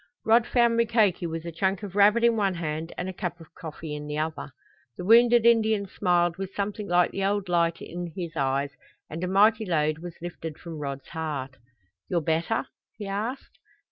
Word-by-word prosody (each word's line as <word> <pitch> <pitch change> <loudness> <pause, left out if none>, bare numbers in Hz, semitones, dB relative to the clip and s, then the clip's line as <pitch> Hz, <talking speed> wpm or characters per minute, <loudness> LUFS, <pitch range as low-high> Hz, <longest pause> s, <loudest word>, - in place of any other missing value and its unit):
Rod 225 +1 +4
found 235 -2 +3
Mukoki 220 -7 +2
with 165 0 -5
a 170 - -4
chunk 190 +5 -1
of 200 -2 -7
rabbit 210 +3 +5
in 235 -1 +5
one 200 -4 +1
hand 160 0 -4
and 180 - -3
a 190 - -4
cup 175 -1 -4
of 165 0 -15
coffee 160 -2 -7
in 150 0 -6
the 150 0 -3
other. 155 -2 -3 0.5
The 180 - -5
wounded 235 +2 +6
Indian 220 -3 +4
smiled 175 -3 +1
with 195 0 -6
something 205 +1 -3
like 175 0 +3
the 195 - -3
old 200 0 0
light 170 -1 +1
in 175 0 -6
his 170 -3 -5
eyes 140 -1 0 0.4
and 165 +3 -5
a - - 0
mighty 215 +4 +4
load 155 -5 0
was 175 0 -8
lifted 165 -2 -7
from 165 -3 -8
Rod's 140 -2 -5
heart. 145 -5 -4 0.5
"You're 175 - +2
better?" 165 +8 0 0.3
he 210 - -6
asked. 215 +7 -4
175 Hz, 195 wpm, -26 LUFS, 160-205 Hz, 0.5 s, wounded